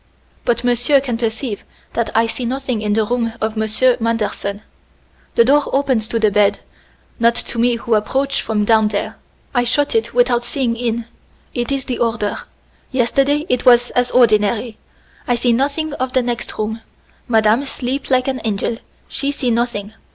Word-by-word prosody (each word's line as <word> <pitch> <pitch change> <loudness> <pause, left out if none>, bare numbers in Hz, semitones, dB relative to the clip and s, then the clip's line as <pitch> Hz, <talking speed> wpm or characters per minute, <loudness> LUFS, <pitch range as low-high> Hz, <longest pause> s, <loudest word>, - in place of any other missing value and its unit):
But 240 0 +1
monsieur 245 +3 +3
can 260 -3 -3
perceive 230 -1 -3 0.3
that 235 -1 -1
I 225 - +4
see 230 +2 -4
nothing 255 -2 -2
in 210 -1 0
the 220 0 +2
room 230 0 -1
of 220 0 -2
Monsieur 220 +3 +2
Manderson. 215 -2 -2 0.7
The 235 - +5
door 285 +3 +4
opens 260 -5 +1
to 230 - -1
the 215 -2 +2
bed, 205 0 +3 0.6
not 235 0 +4
to 235 - -2
me 240 +1 +3
who 235 0 -2
approach 270 +6 0
from 210 -2 -1
down 220 -1 +4
there. 205 -1 -3 0.4
I 245 -2 +2
shut 285 +4 +1
it 225 +1 0
without 245 0 +2
seeing 240 -1 -1
in. 235 -1 -2 0.5
It 240 +1 -2
is 275 -1 -1
the 245 - -3
order. 225 -3 -1 0.5
Yesterday 275 +4 +1
it 250 - 0
was 245 -1 +5
as 245 0 +1
ordinary. 220 -1 +2 0.5
I 245 - +2
see 240 0 +2
nothing 285 +5 -1
of 255 -2 -3
the 255 - +2
next 240 -1 -4
room. 220 +1 -3 0.5
Madame 220 +2 +3
sleep 265 +1 -4
like 255 0 +2
an 260 -2 -2
angel 220 +1 -1 0.3
she 280 0 -1
see 260 -4 -1
nothing. 225 -3 -1
240 Hz, 175 wpm, -18 LUFS, 220-255 Hz, 0.7 s, The